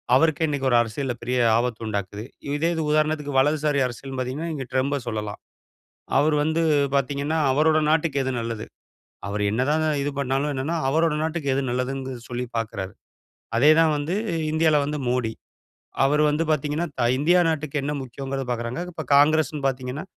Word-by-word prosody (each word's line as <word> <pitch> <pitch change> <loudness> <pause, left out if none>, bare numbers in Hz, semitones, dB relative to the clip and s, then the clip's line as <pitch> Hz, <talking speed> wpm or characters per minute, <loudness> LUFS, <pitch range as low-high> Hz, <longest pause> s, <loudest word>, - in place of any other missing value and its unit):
அவருக்கு 160 +3 +3
இன்னிக்கு 140 -3 -1
ஒரு 120 - +5
அரசியல்ல 120 +3 -3
பெரிய 125 +2 -1 0.2
ஆபத்து 120 -1 -1
உண்டாக்குது. 100 0 -4 0.3
இதே 160 +3 +1
இது 160 - -1
உதாரணத்திக்கு 150 -2 +1
வலதுசாரி 150 +1 +2
அரசியல்னு 130 +2 -7
பாத்தீங்கன்னா, 140 +7 -3
நீங்க 135 -3 -4
ட்ரம்ப 140 +2 +1
சொல்லலாம். 105 -2 -4 0.8
அவர் 150 +2 +3
வந்து 160 +2 +1 0.3
பாத்தீங்கன்னா, 140 +3 0
அவரோட 155 +3 +3
நாட்டுக்கு 155 -3 +1
எது 130 - -1
நல்லது. 115 -2 -4 0.6
அவர் 105 +1 -3
என்ன 115 +4 0
தான் 155 +1 +1 0.2
இது 145 - -1
பண்னாலும் 140 +2 0
என்னனா, 145 +6 -1
அவரோட 160 +2 +2
நாட்டுக்கு 160 -3 -2
எது 140 - +1
நல்லதுனு 130 +1 -3
சொல்லி 125 0 -3
பாக்குறாரு. 100 -4 -4 0.6
அதே 145 +6 +6
தான் 165 -1 +4
வந்து 145 +4 -2 0.4
இந்தியால 155 -1 +3
வந்து 150 +1 -3
மோடி. 120 -3 0 0.7
அவர் 150 +2 +3
வந்து 150 +2 0
பாத்தீங்கன்னா, 150 +3 -1
த - - +1 0.2
இந்தியா 175 +5 +4
நாட்டுக்கு 155 -2 -3
என்ன 145 +2 -2
முக்கியம்ங்கறத 135 +2 -5
பாக்குறாங்க. 120 +3 -3
இப்போ 160 -2 -6
காங்கிரஸ்னு 150 0 +3
பாத்தீங்கன்னா, 130 +2 -4
140 Hz, 160 wpm, -24 LUFS, 125-155 Hz, 0.8 s, அதே